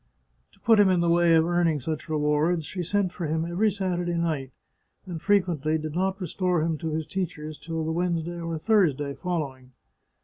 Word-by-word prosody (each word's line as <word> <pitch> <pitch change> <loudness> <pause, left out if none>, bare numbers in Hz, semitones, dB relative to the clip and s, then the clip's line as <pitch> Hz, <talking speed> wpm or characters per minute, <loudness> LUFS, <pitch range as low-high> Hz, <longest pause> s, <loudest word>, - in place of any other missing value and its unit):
To - - -25
put 225 -2 +4
him 200 -2 +6
in 180 -2 +3
the 170 -1 +2
way 170 -1 +5
of 160 0 +4
earning 170 -3 +2
such 155 +4 -4
rewards, 155 +2 +1
she 185 - -5
sent 190 +1 0
for 170 - -4
him 160 +2 -1
every 180 +6 +1
Saturday 180 -3 -2
night, 160 -6 -1 0.6
and 175 -4 -6
frequently 170 -7 +2
did 155 -1 -5
not 190 +3 0
restore 180 -2 0
him 165 0 0
to 160 - -3
his 155 0 -2
teachers 155 -5 -4
till 165 -1 -4
the 160 - -1
Wednesday 170 0 -1
or 165 -1 -3
Thursday 155 - +2
following. 135 -5 -4
170 Hz, 190 wpm, -26 LUFS, 155-180 Hz, 0.6 s, him